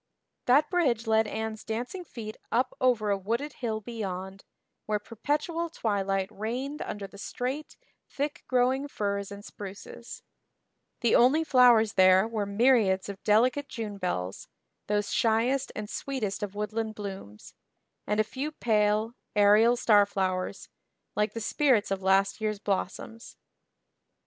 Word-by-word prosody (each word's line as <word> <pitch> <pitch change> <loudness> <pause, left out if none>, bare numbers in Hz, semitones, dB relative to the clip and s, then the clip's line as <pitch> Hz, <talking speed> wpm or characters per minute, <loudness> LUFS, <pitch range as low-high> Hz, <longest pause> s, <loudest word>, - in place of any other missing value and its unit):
That 285 +7 +4
bridge 260 - +1
led 220 0 +3
Anne's 220 0 -4
dancing 245 +11 -4
feet 220 -9 -8 0.2
up 250 +2 +1
over 235 -5 +2
a 200 - +2
wooded 235 +9 -2
hill 220 -3 -2
beyond, 195 -4 -6 0.4
where 215 0 +1
perpetual 295 - -2
twilight 195 -8 -1
reigned 250 +8 -4
under 205 -1 -5
the 195 +1 -12
straight, 260 +7 -4 0.3
thick 290 +1 -3
growing 260 +2 +2
firs 200 -5 -3
and 200 +1 -9
spruces; 200 +4 -9 0.8
the 235 - +3
only 270 +7 +5
flowers 245 -7 +5
there 185 +2 +5
were 215 -3 -2
myriads 200 -3 +3
of 200 -1 -8
delicate 250 +7 +3
"June 210 -4 -5
bells," 95 - -3 0.4
those 205 0 0
shyest 235 +4 +1
and 210 0 -5
sweetest 220 -5 -3
of 205 -1 -4
woodland 215 +1 -3
blooms, 195 - -8 0.5
and 210 +1 0
a - - +5
few 270 +7 -4
pale, 215 -3 +1 0.2
aerial 210 +3 +6
starflowers, 200 -4 +1 0.5
like 210 +1 0
the - - -2
spirits 230 -2 +2
of 195 -1 -1
last 195 +2 +2
year's 215 -1 -1
blossoms. 205 +3 -4
220 Hz, 135 wpm, -28 LUFS, 200-245 Hz, 0.8 s, aerial